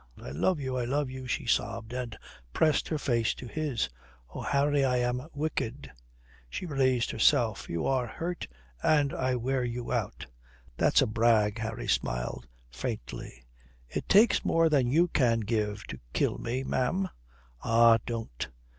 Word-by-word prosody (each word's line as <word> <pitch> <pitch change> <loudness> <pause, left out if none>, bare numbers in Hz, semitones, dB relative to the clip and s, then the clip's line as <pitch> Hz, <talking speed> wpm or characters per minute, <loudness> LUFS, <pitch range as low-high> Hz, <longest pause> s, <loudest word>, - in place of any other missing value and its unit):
"I 60 - -8
love 145 - +1
you, 130 -2 -2
I 125 - -1
love 140 +1 -1
you," 130 0 -7
she 125 - -2
sobbed, 115 0 -1
and 125 -3 -4 0.4
pressed 155 -2 +2
her 155 - -1
face 115 -6 +1
to - - -9
his.... 145 -1 -1 0.5
"Oh, - - -5
Harry, 140 0 +2
I 125 -1 +2
am 125 +3 -1
wicked." 145 -3 -3 0.6
She 125 - -5
raised 130 -6 +1
herself. 115 -2 +2
"You 85 -1 -2
are 130 -2 +1
hurt, 170 +8 -4 0.3
and 145 -3 +3
I 130 -1 0
wear 130 +2 0
you 120 0 -4
out." - - -2 0.5
"That's - - +4
a - - +2
brag." 110 -1 +2
Harry 110 +2 -4
smiled - - -1 0.2
faintly, - - -6 0.4
"It - - -4
takes 215 +4 +5
more 165 0 +3
than 140 -5 +3
you 165 +8 +4
can 120 -8 +2
give 105 -1 -1
to - - -8
kill - - +1
me, 125 +3 -2
ma'am." 170 +10 0 0.6
"Ah, 115 0 +6
don't." 115 - -4
125 Hz, 155 wpm, -29 LUFS, 115-140 Hz, 0.6 s, Ah